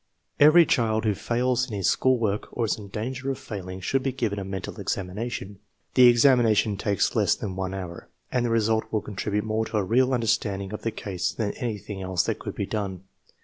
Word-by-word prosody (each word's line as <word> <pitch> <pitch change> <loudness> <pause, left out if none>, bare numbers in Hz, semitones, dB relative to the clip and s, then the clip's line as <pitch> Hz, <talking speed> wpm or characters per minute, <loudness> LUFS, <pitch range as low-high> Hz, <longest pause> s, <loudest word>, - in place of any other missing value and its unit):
Every 155 +4 +8
child 110 -5 +1
who 105 - +3
fails 125 +4 0
in 105 - -4
his 95 - 0
school 130 -1 +3
work 105 -3 -1
or 115 - 0
is 110 - 0
in 100 - -9
danger 130 +6 -4
of 135 - -2
failing 95 -3 -7
should 135 +8 0
be 135 0 -1
given 115 -6 -2
a - - -4
mental 95 -1 -6
examination. 100 +1 -4 0.3
The 125 -2 +8
examina 120 -2 +5
tion 105 -1 +2
takes 100 -1 0
less - - +3
than 95 -2 -5
one 95 0 -3
hour, 90 -3 -7 0.2
and 125 -1 +1
the 120 - 0
result 110 -1 +2
will 110 - 0
con 105 - -9
tribute 105 +1 -1
more 110 0 0
to 110 - -3
a 105 - +2
real 125 +6 +2
understanding 105 -5 0
of 105 - -5
the 115 - -1
case 95 -4 -3
than 105 -3 -2
any 115 -4 -3
thing 100 -1 -7
else 95 -1 0
that - - -2
could - - -6
be - - -2
done. 95 -4 -4
110 Hz, 225 wpm, -25 LUFS, 100-120 Hz, 0.3 s, Every